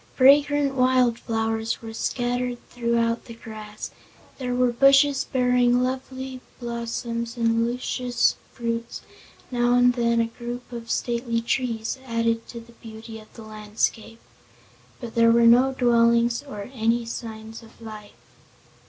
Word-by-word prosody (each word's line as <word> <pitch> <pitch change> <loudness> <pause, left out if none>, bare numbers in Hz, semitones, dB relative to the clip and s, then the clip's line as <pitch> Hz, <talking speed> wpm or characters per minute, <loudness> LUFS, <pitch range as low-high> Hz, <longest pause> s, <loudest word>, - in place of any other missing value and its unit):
Fragrant 285 +1 +5
wild 255 -2 +3
flowers 225 0 -2
were 225 0 -7
scattered 245 +1 -2
throughout 235 -1 0
the 230 - -10
grass; 215 -2 -8 0.5
there 250 -1 -2
were 250 -1 +3
bushes 275 +2 +4
bearing 250 -1 +3
lovely 260 0 -4 0.2
blossoms 235 0 -4
and 230 0 +2
luscious 245 0 0 0.2
fruits; 230 -1 -4 0.5
now 240 0 +2
and 245 0 +5
then 235 -1 +1
a 230 - +3
group 240 +2 -7
of 235 -1 -7
stately 235 -1 -1
trees 230 0 -2
added 230 -1 0
to 235 - -8
the 230 +1 -15
beauty 225 -1 -10
of 215 - -17
the 225 - -10
landscape. 215 +1 -3 0.8
But 235 -3 -7
there 230 0 +5
were 235 0 +5
no 245 +3 +6
dwellings 235 -1 +3
or 205 -7 -7 0.4
signs 225 -1 -7
of 225 0 -18
life. 215 -2 -10
235 Hz, 130 wpm, -24 LUFS, 230-250 Hz, 0.8 s, no